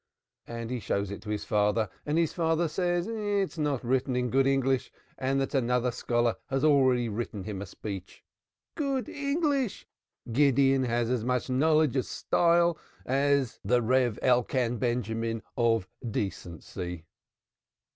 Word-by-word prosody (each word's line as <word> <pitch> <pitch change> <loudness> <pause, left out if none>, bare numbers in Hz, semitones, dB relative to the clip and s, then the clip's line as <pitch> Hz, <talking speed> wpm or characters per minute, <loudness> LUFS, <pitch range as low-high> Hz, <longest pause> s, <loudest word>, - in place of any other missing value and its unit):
And 115 0 -5
he 125 - -2
shows 100 -2 -2
it 100 - -6
to - - -9
his 105 -1 -2
father, 105 +1 +2 0.2
and 150 +2 +1
his 165 -2 +1
father 165 0 +1
says 175 +2 0
it 225 - -4
is 205 -5 -1
not 145 -5 -1
written 130 +1 +1
in 125 -1 0
good 135 +1 +3
English, 135 -1 +1 0.2
and 135 +1 0
that 135 - -2
another 125 -1 +1
scholar 120 -1 0
has 135 0 -1
already 130 -5 +4
written 105 -2 -4
him 100 -1 -5
a 100 - -6
speech. 95 -1 -8 0.5
Good 275 -5 -1
English! 280 - -1 0.5
Gideon 135 0 +4
has 120 0 0
as 125 -3 0
much 125 +1 -1
knowledge 155 +1 +3
or 130 - +3
style 170 +4 +2 0.3
as 140 -1 +1
the 120 0 +2
Rev. 125 -1 +2
Elkan 125 -1 +2
Benjamin 115 -2 -1
of 115 -5 +2 0.2
decency. 90 -4 -5
125 Hz, 145 wpm, -28 LUFS, 115-150 Hz, 0.5 s, already